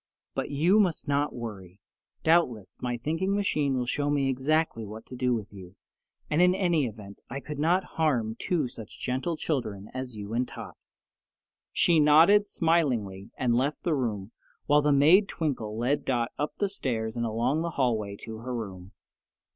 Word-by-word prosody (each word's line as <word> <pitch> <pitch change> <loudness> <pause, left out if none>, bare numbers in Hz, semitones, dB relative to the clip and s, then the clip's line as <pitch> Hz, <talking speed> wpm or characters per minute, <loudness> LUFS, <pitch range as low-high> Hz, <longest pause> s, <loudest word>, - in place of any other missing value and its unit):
But - - -3
you 170 +9 +3
must 185 -6 +1
not 145 +1 +1
worry. 100 -6 -8 0.4
Doubtless, 130 - +2
my 120 -1 -2
thinking 165 +10 -1
machine 150 -9 +1
will 125 - -1
show 145 +4 -1
me 140 -2 +1
exactly 135 -1 0
what 110 +1 -9
to 130 - -9
do 125 -1 +1
with 105 -3 -6
you, 95 -1 -11 0.5
and 150 +3 +2
in 180 +1 +5
any 170 -8 +2
event 105 -3 -10
I 135 - -4
could 150 +1 -7
not 175 +5 +3 0.2
harm 120 -9 +1
two 160 -7 0
such 115 -3 -10
gentle 135 +6 -2
children 110 -12 -3
as 130 -2 -5
you 105 +1 -6
and 125 +2 0
Tot." - - -9 1.0
She 170 -2 +3
nodded 165 +8 +6
smilingly 125 - 0
and 120 -2 +1
left 135 +5 0
the 170 - +1
room, 110 -7 -2 0.3
while 145 +1 +4
the 150 0 +2
maid 160 +9 +6
Twinkle 120 -9 -3
led 125 +5 0
Dot 120 -2 0
up 150 - -2
the 205 - 0
stairs 115 - -3
and 120 - -1
along 120 +8 0
the 170 - -1
hallway 110 -6 0
to 110 0 -7
her 125 +2 -5
room. 95 -5 -7
130 Hz, 175 wpm, -28 LUFS, 110-155 Hz, 1.0 s, nodded